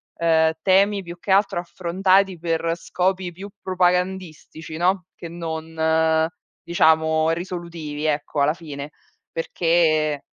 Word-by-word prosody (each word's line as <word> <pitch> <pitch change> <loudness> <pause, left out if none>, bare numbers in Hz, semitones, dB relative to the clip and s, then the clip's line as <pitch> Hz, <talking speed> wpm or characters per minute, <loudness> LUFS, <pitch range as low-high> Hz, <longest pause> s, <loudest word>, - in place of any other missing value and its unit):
ehm, 160 -1 +3
temi 195 +2 +3
più 170 0 -9
che 195 - -4
altro 195 -2 +3
affrontati 185 +2 +1
per 165 0 -1
scopi 180 +1 -2
più 195 +4 -9
propagandistici, 180 -3 -1
no, 180 +1 +1
che 170 - -8
non, 160 -1 0 0.4
diciamo, 160 -1 +3
risolutivi, 170 -3 -5
ecco, 150 0 -1
alla 145 +2 +3
fine. 150 -3 -8 0.4
Perché 160 -3 +1
170 Hz, 110 wpm, -22 LUFS, 160-180 Hz, 0.4 s, ehm